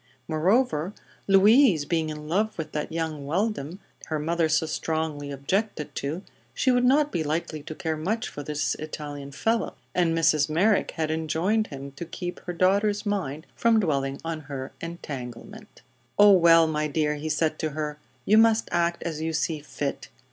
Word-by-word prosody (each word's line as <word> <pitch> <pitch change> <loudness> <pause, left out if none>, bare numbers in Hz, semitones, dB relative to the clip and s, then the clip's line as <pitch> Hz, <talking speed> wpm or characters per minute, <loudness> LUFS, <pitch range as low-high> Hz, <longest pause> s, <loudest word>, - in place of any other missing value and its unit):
Moreover, 175 - +1 0.3
Louise 200 - +6
being 160 0 0
in 150 0 -7
love 210 +7 0
with 155 -2 -5
that 150 - -3
young 160 -3 -3
Weldon 180 -2 -1 0.3
her 155 - -1
mother 165 +2 0
so 160 +1 +2
strongly 155 -2 -2
objected 150 +5 -2
to, 155 +7 -4 0.3
she 260 - +3
would 245 0 +3
not 285 +4 +4
be 160 - -1
likely 155 0 -2
to 155 +2 -8
care 160 0 -2
much 215 +10 -2
for 145 - -7
this 150 +1 -1
Italian 145 -2 -6
fellow, 225 - -1 0.2
and 165 -2 +2
Mrs. 155 -2 +3
Merrick 195 +7 +2
had 155 -1 0
enjoined 160 +7 0
him 140 -1 -8
to 145 +5 -7
keep 175 +1 -6
her 180 - -3
daughter's 200 +4 +2
mind 175 -7 -2
from 230 -1 +3
dwelling 140 -7 0
on 165 -1 -3
her 140 -3 -6
"entanglement." 165 - -8 0.3
"Oh, 205 0 +8
well, 165 -3 +7
my 155 -1 -1
dear," 150 0 0
he 150 +1 -4
said 155 +1 0
to 155 - -1
her, 150 -1 -3 0.3
"you 215 +2 +6
must 225 0 +4
act 170 0 0
as 160 -2 -4
you 160 0 -2
see 160 0 -1
fit. 145 -1 -5
160 Hz, 170 wpm, -26 LUFS, 150-195 Hz, 0.3 s, Oh